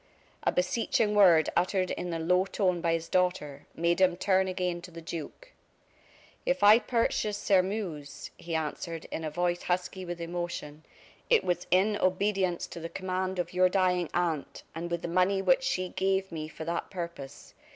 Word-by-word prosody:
A - - +1
beseeching 210 +3 +1
word 175 -6 +6
uttered 185 0 +1
in 175 0 -4
a 165 - -2
low 180 +3 +2
tone 185 -3 0
by 165 -1 +1
his 165 0 -2
daughter, 175 -7 -1
made 170 +2 +1
him 180 -2 +4
turn 190 0 +2
again 180 -2 -2
to 180 - -10
the 170 -1 -10
duke. 165 - -8 0.9
"If - - 0
I 210 +3 +8
purchased 215 -3 -1
Sairmeuse," 185 -7 -1
he 170 -1 -5
answered, 160 +1 -4
in 160 - -4
a 155 - -2
voice 175 +2 -1
husky 180 +1 -2
with 175 -1 -6
emotion, 170 -3 -5 0.5
"it 470 - +5
was 175 0 -1
in 205 +3 +3
obedience 185 -1 0
to - - -8
the 165 0 -6
command 185 0 -3
of 175 - -3
your 185 0 +4
dying 180 -3 +1
aunt, 170 -5 -2
and 170 +2 -5
with 170 0 -3
the - - -2
money 185 +3 +2
which 185 +1 +3
she 185 -9 -1
gave 190 0 0
me 155 -2 -5
for 160 0 -8
that 170 +1 -3
purpose. 170 -7 -7
180 Hz, 175 wpm, -29 LUFS, 170-190 Hz, 0.9 s, I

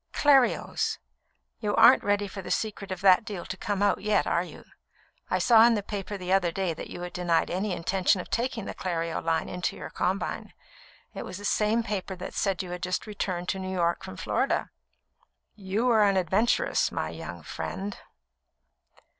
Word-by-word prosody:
"Clerios. 275 -4 +3 0.6
You 210 -2 -1
aren't 230 +3 +7
ready 205 0 +1
for 195 0 -7
the - - -8
secret 205 -3 -2
of 185 -1 -4
that 190 -1 +6
deal 205 -6 -6
to 185 - -5
come 200 +1 -2
out 205 - +2
yet, 210 +1 +2
are - - +1
you? - - -11 0.7
I - - +2
saw 225 -2 +6
in 235 - +3
the 205 - -2
paper 205 0 -5
the 185 0 -2
other 185 -3 +3
day 185 -1 -1
that - - -8
you - - -7
had 180 0 -6
denied 175 -2 +1
any 190 +3 -1
intention 185 +2 +1
of - - -6
taking 235 -3 -1
the - - -5
Clerio 165 -2 -3
line 165 -1 0
into 180 -1 -3
your - - -8
combine. 190 +2 -2 0.6
It - - -5
was 185 - -7
the 205 - -8
same 215 +3 +2
paper 200 -3 -3
that 180 - -7
said 195 -2 0
you 180 - -8
had 180 0 -5
just 180 0 -2
returned 185 -4 -3
to 190 - -1
New 190 0 -4
York 170 -2 0
from 95 - -8
Florida." - - 0 0.8
"You 205 +4 -1
are 220 -2 +5
an 200 -2 +3
adventuress, 190 +6 +2
my - - -2
young - - -8
friend." 200 +1 -5
195 Hz, 190 wpm, -27 LUFS, 180-210 Hz, 0.8 s, aren't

